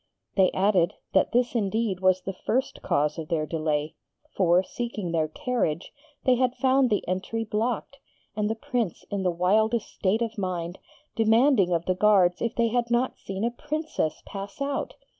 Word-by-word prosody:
They 190 -2 +4
added, 190 -3 +2 0.2
that 190 - +3
this 245 +1 +2
indeed 215 -3 0
was 185 -1 +3
the 195 - -4
first 255 +8 -2
cause 150 +2 0
of 160 - -5
their 155 -2 0
delay; 155 -1 -1 0.4
for, 180 -1 +4
seeking 215 -4 -4
their 160 -2 +1
carriage, 170 -2 -2 0.3
they 255 - +5
had 255 0 +1
found 265 -1 +3
the 210 - 0
entry 190 +5 -2
blocked, 225 +5 -2 0.4
and 210 0 0
the 220 - -1
Prince 240 - -3
in 200 -1 -1
the 185 - +1
wildest 215 +6 +1
state 210 +4 +1
of 225 -1 -4
mind, 180 -2 -3 0.4
demanding 225 -3 +4
of 170 -1 0
the 185 - +2
guards 185 -2 +4
if 235 - -1
they 230 -1 +2
had 240 0 0
not 240 +2 0
seen 195 +1 -5
a 235 - +1
Princess 295 - -3
pass 200 +3 -7
out. 280 0 -2
210 Hz, 175 wpm, -26 LUFS, 180-235 Hz, 0.4 s, they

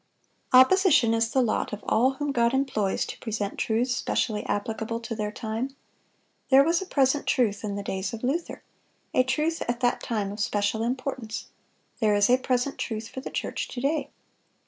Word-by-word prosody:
Opposition 260 - +6
is 225 0 +1
the 260 +2 +2
lot 225 - -1
of 210 - -6
all 255 +4 +3
whom 290 +1 -2
God 235 -1 +2
employs 220 -8 0
to - - -8
present 215 -3 -3
truths 240 +3 +1
specially 215 -3 -1
applicable 220 +2 -2
to 230 0 -5
their 210 -1 -3
time. 225 +5 -4 0.7
There 270 +1 +7
was 335 +4 +2
a 380 - -6
present 275 -2 +2
truth 225 -6 +1
in 205 -1 -3
the 200 - -4
days 190 +1 -3
of 230 0 -7
Luther,—a 275 -2 -3
truth 300 +5 0
at 240 0 -1
that 245 -1 +1
time 210 -4 -2
of 205 - -8
special 210 +1 0
importance; 250 -2 -3 0.5
there 215 -3 +3
is 205 +3 +4
a 255 - +5
present 255 +1 -1
truth 225 -1 -4
for 260 - -7
the - - -6
church - - -3
to 245 - -6
day. 290 +5 0
240 Hz, 180 wpm, -26 LUFS, 220-265 Hz, 0.7 s, There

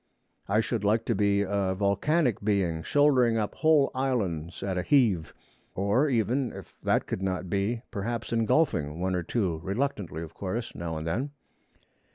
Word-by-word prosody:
I 105 +3 +3
should 115 -1 -2
like 110 +3 +2
to 115 - +1
be 100 -1 +2
a 100 -1 0
volcanic 105 - +1
being, 95 -6 +1
shouldering 130 - +3
up 105 -2 -1
whole 155 -3 +3
islands 100 - -2
at 95 -2 -1
a 90 - 0
heave; 100 - +2 0.4
or 105 +10 +2
even, 120 +1 +1
if - - -11
that - - +1
could - - -4
not 95 -2 -2
be, 105 +4 -1
perhaps 115 +2 -3
engulfing 110 - +1
one 95 +1 0
or 90 - 0
two, 90 -3 -1
reluctantly 95 - -2
of 80 0 -10
course, 105 +6 -4
now 85 -2 -4
and 80 - -5
then. 115 - -1
100 Hz, 165 wpm, -28 LUFS, 95-120 Hz, 0.4 s, I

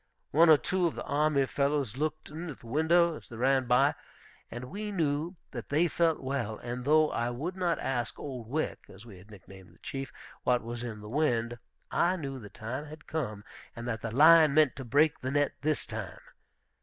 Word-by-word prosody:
One 165 +3 +6
or 155 - +9
two 180 +3 0
of 165 - -4
the - - -5
army 145 -2 +2
fellows 140 -4 0
looked 155 +2 -3
in 165 +3 -6
at 145 - -9
the - - -16
window 160 +6 +3
as - - -15
they 115 - -9
ran 130 +2 +2
by, 130 +4 +4 0.6
and 120 +1 -7
we 205 +9 -5
knew 160 -1 -1 0.2
that 120 -4 -7
they 155 +5 +3
felt 165 -1 +1
well; 130 -5 -3
and 125 +1 -5
though 155 +1 +4
I 120 +1 -1
would 150 +10 -4
not 175 -3 0
ask 120 -3 -2
Old 125 -6 -7
Wick, 155 +4 -2
as 100 +4 -13
we 100 -6 -12
had 100 +4 -17
nicknamed 95 -2 -14
the - - -26
Chief, 135 -1 -5 0.3
what 125 -1 +1
was 120 +1 -5
in 110 -3 -6
the 105 - -9
wind, 120 -3 0 0.3
I 175 +2 +2
knew 135 -6 -5
the 105 -3 -10
time 125 +9 -6
had 155 +1 -11
come, 110 -10 -4 0.3
and 115 +1 -6
that 115 -2 -3
the 115 - -3
lion 155 +4 +7
meant 155 -4 +4
to 135 - -5
break 145 +5 +3
the 130 - -3
net 145 +1 +1
this 155 0 0
time. 110 -5 -6
140 Hz, 210 wpm, -30 LUFS, 120-155 Hz, 0.6 s, or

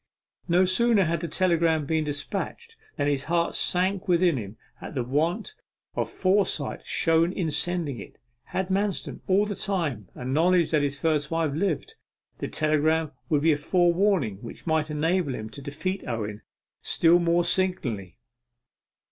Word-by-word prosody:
No 180 +1 +4
sooner 205 +1 +3
had 165 0 0
the 170 - -4
telegram 165 -2 +2
been 160 +1 0
despatched 150 - -4 0.2
than 145 - 0
his 140 -1 0
heart 170 +1 +1
sank 190 +2 +1
within 175 -2 +3
him 105 -3 -6 0.2
at - - -8
the 125 - 0
want 155 - -1 0.4
of - - -2
foresight 185 -6 0
shown 165 +1 +2
in 170 -4 -2
sending 150 -4 -1
it. - - -11 0.3
Had 190 0 -3
Manston, 195 +1 -1
all 195 +2 +3
the 205 - -3
time, 160 - -2
a 125 - -7
knowledge 165 +5 +3
that 155 -2 +3
his 145 0 -1
first 150 -2 0
wife 165 -3 0
lived, 160 0 -1 0.5
the - - -3
telegram 155 0 +1 0.2
would 150 -3 +2
be 165 - +5
a 150 - +2
forewarning 175 - +2
which 115 +3 -11
might 160 -2 +1
enable 155 -1 0
him 110 0 -7
to 140 - -10
defeat 150 +7 -4
Owen 110 -3 -4 0.4
still 170 +1 +4
more 170 0 +2
signally. 130 - -1
165 Hz, 155 wpm, -26 LUFS, 145-180 Hz, 0.5 s, be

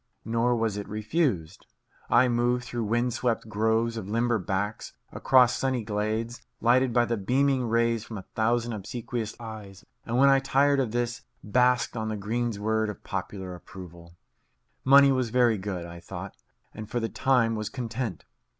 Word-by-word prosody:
Nor 115 +2 +1
was 110 -3 -1
it 100 - -6
refused. 105 - -1 0.4
I 130 - +5
moved 120 0 +1
through 120 -2 -3
wind 120 +3 0
swept 120 -2 -1
groves 110 +2 0
of 100 -3 -6
limber 115 +1 +1
backs; 100 +3 -3 0.2
across 125 -2 +4
sunny 130 -3 -1
glades, 110 +3 -2 0.2
lighted 125 +2 +3
by 120 0 +3
the 115 -1 -1
beaming 130 +4 +1
rays 115 -1 +1
from 110 -2 -8
a 95 - -7
thousand 120 +1 0
obsequious 110 +2 -5
eyes; 105 -4 -9 0.2
and 120 +1 -2
when 140 +2 +6
I 135 0 +5
tired 140 +1 +2
of 130 -4 0
this, 120 +1 -2 0.2
basked 125 +3 +2
on 110 -1 -2
the 110 - -3
greensward 110 0 -1
of 105 - -8
popular 95 -1 -5
approval. 85 -1 -12 0.7
Money 140 +1 +7
was 130 -3 0
very 120 -3 +3
good, 95 -3 -4
I 85 0 -9
thought, 85 - -8 0.4
and 110 -1 -8
for 120 - -1
the 115 - -1
time 125 -1 +2
was 110 -1 -3
content. 115 -6 -4
115 Hz, 165 wpm, -27 LUFS, 105-125 Hz, 0.7 s, Money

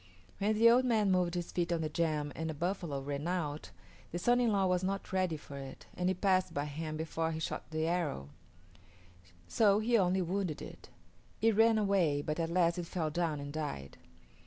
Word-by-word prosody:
When 210 +2 +1
the 225 +2 +6
old 245 +2 +6
man 220 -5 +2
moved 180 -1 +1
his 175 -1 -3
feet 175 -1 -1
on 170 -1 0
the 155 - -1
jam 150 -2 -1
and 160 0 -3
a 160 - -4
buffalo 170 -4 -2
ran 145 +2 -3
out, 155 -5 -2 0.4
the 175 - -3
son 245 +7 +3
in 235 -2 +3
law 195 -2 +2
was 180 0 +1
not 195 0 -3
ready 185 -4 +1
for 145 -1 -10
it, 135 -1 -9
and 180 0 0
it 185 -1 -2
passed 185 -2 +2
by 145 +1 -1
him 155 +1 -5
before 160 0 -2
he 160 - -4
shot 160 - -4
the 155 0 -1
arrow; 165 - -1 1.2
so 205 - +4
he 230 +2 +3
only 185 0 +2
wounded 180 -3 -2
it. - - -10 0.5
It 225 -1 +3
ran 225 +1 +5
away, 185 -9 +2
but 150 +2 -3
at 165 -1 0
last 170 0 +2
it 170 - -4
fell 160 -4 -2
down 160 -2 -1
and 145 0 -6
died. 70 - -5
175 Hz, 205 wpm, -32 LUFS, 155-195 Hz, 1.2 s, the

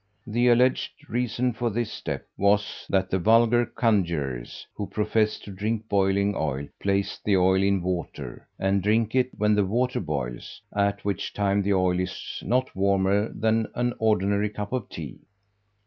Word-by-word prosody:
The 120 +2 +1
alleged 125 +4 +2
reason 125 +1 0
for 120 +1 -1
this 115 +1 -2
step - - -5
was, 100 +1 +1
that 95 -1 +1
the 95 - +1
vulgar 115 +4 +4
conjurors, 85 - -1
who 100 - -5
profess 105 +2 0
to 100 - -9
drink 110 +3 -3
boiling 100 0 +2
oil, 70 -4 -2
place 100 0 -1
the 100 -2 +3
oil 95 +1 +4
in 100 -2 +2
water, 90 -2 -4
and 95 0 +1
drink 110 +3 +1
it 130 -1 +2
when 105 0 +3
the 105 -1 +3
water 120 +6 0
boils, 70 -8 -4 0.2
at 100 0 0
which 100 -3 -2
time 100 0 +1
the 100 0 +1
oil 90 -1 +2
is 90 - -5
not 130 +2 0
warmer 100 +2 +2
than 110 0 +1
an 120 0 0
ordinary 105 -1 +2
cup 105 +2 -6
of 125 -5 -2
tea. 75 -6 -8
100 Hz, 165 wpm, -26 LUFS, 95-115 Hz, 0.2 s, vulgar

